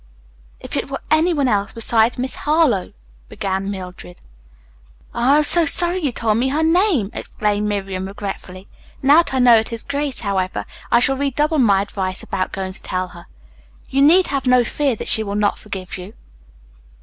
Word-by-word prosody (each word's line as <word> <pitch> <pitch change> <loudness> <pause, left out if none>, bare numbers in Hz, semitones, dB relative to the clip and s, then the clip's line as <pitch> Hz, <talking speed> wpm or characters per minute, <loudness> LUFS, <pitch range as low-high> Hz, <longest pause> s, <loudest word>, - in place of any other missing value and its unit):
"If - - -7
it - - -3
were 275 - -4
any 315 +3 +3
one 285 -5 0
else 205 -4 0
besides 230 0 +1
Miss 255 +1 -2
Harlowe," 300 - +1 0.4
began 195 0 -3
Mildred. 180 - -8 1.0
"Oh, 245 +4 +2
I - - +5
am 305 - +3
so 330 +2 +5
sorry 350 +4 +2
you 295 -7 -1
told 225 -2 0
me 255 - +1
her 295 +4 0
name!" 325 - +2
exclaimed 210 0 -2
Miriam 195 -2 -3
regretfully. 195 -1 -8 0.4
"Now 285 +3 +6
that 340 - +3
I - - +1
know 245 -3 +6
it 220 - -4
is 230 -1 -4
Grace, 280 -1 -2
however, 190 -3 -2 0.3
I 235 - +4
shall 270 +2 +3
redouble 295 +3 0
my 200 -6 +3
advice 190 -2 -5
about 185 -1 -3
going 190 -1 -5
to 185 -1 -4
her. 175 +1 -14 0.6
You 275 +1 +1
need 345 +6 +6
have 275 -1 -3
no 250 -1 +5
fear 275 +2 -1
that - - -7
she 220 - +4
will 200 -1 -4
not 210 -1 0
forgive 190 -3 -7
you. 185 +5 -10
230 Hz, 185 wpm, -19 LUFS, 195-285 Hz, 1.0 s, Now